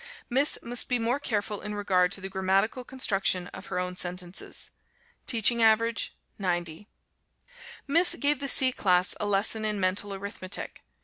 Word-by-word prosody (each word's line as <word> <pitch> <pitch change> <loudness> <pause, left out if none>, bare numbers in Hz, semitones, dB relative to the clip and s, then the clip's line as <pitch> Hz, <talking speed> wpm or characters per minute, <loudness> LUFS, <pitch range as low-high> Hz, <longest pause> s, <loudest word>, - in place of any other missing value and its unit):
Miss 275 +4 +3
must 240 0 -3
be 250 - +2
more 240 +4 0
careful 210 -6 -2
in 210 0 -5
regard 185 -3 +2
to 200 - -4
the 190 - -4
grammatical 195 +5 0
construction 195 -8 0
of - - -10
her - - -3
own 180 0 -2
sentences. 180 0 -3 0.6
Teaching 235 0 +3
average 225 0 +2 0.2
90. 175 0 -2 1.0
Miss 335 +5 +3
gave 290 -1 +1
the 280 - -3
C 260 -1 +5
class 180 -6 +2
a 210 - -1
lesson 205 +2 +2
in 210 -1 -1
Mental 195 +2 0
Arithmetic. 195 -1 -6
205 Hz, 150 wpm, -28 LUFS, 185-235 Hz, 1.0 s, C